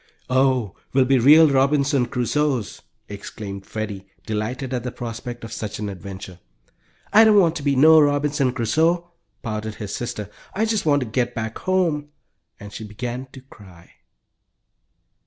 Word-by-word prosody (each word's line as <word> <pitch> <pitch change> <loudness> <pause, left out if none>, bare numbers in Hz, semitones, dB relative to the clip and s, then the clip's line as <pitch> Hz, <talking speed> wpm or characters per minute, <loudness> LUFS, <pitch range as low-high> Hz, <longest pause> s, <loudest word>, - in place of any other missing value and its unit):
"Oh, 130 -6 +2 0.2
we'll 130 -1 +4
be 135 0 +3
real 155 +6 +7
Robinson 140 -1 +2
Crusoes!" 130 -1 -1 0.3
exclaimed 100 -1 -8
Freddie, 105 -3 -5 0.2
delighted 120 +5 -3
at 125 - -1
the 125 - -5
prospect 120 0 -7
of 115 - -8
such 105 -1 -5
an 105 -1 -4
adventure. 95 -1 -9 0.7
"I 220 +2 +8
don't 215 -2 +6
want 170 -3 +3
to - - -6
be 140 -1 +1
no 155 +4 +7
Robinson 145 -2 +1
Crusoe!" 160 +9 0 0.3
pouted 110 -1 -4
his 105 -1 -6
sister. 105 -4 -5 0.2
"I 215 +3 +1
just 220 -6 -1
want 145 -1 +3
to - - -2
get 120 +2 -2
back 110 -1 -4
home," 170 -6 0 0.5
and 105 0 -10
she - - -7
began 120 +4 -6
to 135 - -11
cry. 95 -9 -17
125 Hz, 155 wpm, -22 LUFS, 110-145 Hz, 0.7 s, I